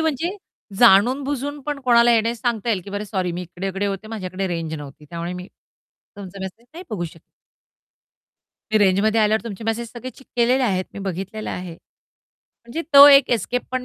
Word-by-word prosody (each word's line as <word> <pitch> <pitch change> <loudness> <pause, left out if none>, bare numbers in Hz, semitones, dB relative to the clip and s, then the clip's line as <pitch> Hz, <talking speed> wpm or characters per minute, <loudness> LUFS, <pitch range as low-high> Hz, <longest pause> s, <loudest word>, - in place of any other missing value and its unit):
म्हणजे 320 +4 -1 0.4
जाणून-बुजून 265 +6 +3
पण 295 -1 -3
कोणाला 240 -2 +5
येण्यास 230 +1 0
सांगता 235 -3 -1
येईल, 205 -4 0
की 200 - -10
बरं 205 +1 -4
सॉरी 190 -3 -2
मी 175 +1 -4
इकडे-इकडे 190 +3 -4
होते 200 +1 -4
माझ्याकडे 190 -3 -4
रेंज 165 -2 -3
नव्हती 145 0 -10
त्यामुळे 170 +1 -4
मी 180 0 -7 0.7
तुमचा 195 -1 -9
मेसेज 220 +5 -8
नाही 355 +3 -9
बघू 195 -6 -3
शकले. 165 -1 -10 1.5
मी 215 - +3
रेंजमध्ये 205 +3 +3
आल्यावर 215 +1 +2
तुमचे 225 -1 -7
मेसेज 225 +1 -2
सगळे 250 +1 -7
चेक 270 - -19
केलेले 245 +2 +3
आहेत, 185 -6 0
मी - - -7
बघितलेलं 195 +3 -5
आहे. 180 -1 -6
म्हणजे 235 - -12
तो 280 +1 +12
एक 275 -2 +6
एस्केप 245 +2 0
पण 255 -1 -2
215 Hz, 175 wpm, -21 LUFS, 185-245 Hz, 1.5 s, तो